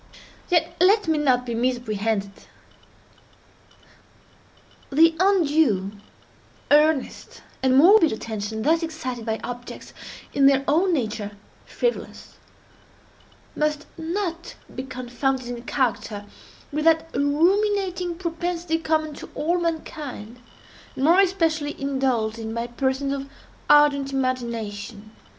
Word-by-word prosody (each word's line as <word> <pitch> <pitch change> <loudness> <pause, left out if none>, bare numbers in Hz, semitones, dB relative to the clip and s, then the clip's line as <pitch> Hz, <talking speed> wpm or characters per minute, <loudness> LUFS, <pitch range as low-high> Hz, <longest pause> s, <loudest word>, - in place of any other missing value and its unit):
Yet 335 -2 +1
let 410 +1 +4
me 315 -2 +2
not 255 -4 +2
be 240 - -4
misapprehended. 225 -4 -1 2.6
The 320 +3 +5
undue, 310 - +2 0.8
earnest, 300 -1 +2 0.2
and 260 0 +3
morbid 345 +2 +7
attention 220 0 -4
thus 325 +3 +3
excited 255 -8 -5
by 220 0 -1
objects 245 0 -8 0.4
in 275 -1 +5
their 275 -1 +4
own 345 +6 +3
nature 215 -8 -2 0.3
frivolous, 485 0 -4 1.2
must 300 0 -1
not 340 +1 -4 0.2
be - - -4
confounded 260 0 -3
in 240 -1 -6
character 210 -6 -2 0.5
with 305 +2 -2
that 325 0 +4
ruminating 360 +4 +1
propensity 340 -1 -2
common 315 -1 0
to - - -10
all 345 +4 0
mankind, 300 -8 -5 0.6
and 265 - -3
more 335 +6 +5
especially 325 -6 +1
indulged 260 -5 -1
in 225 0 -5
by 235 0 -2
persons 265 +3 -1
of 275 0 -5 0.4
ardent 285 -2 +5
imagination. 230 -5 -3
280 Hz, 105 wpm, -23 LUFS, 240-325 Hz, 2.6 s, morbid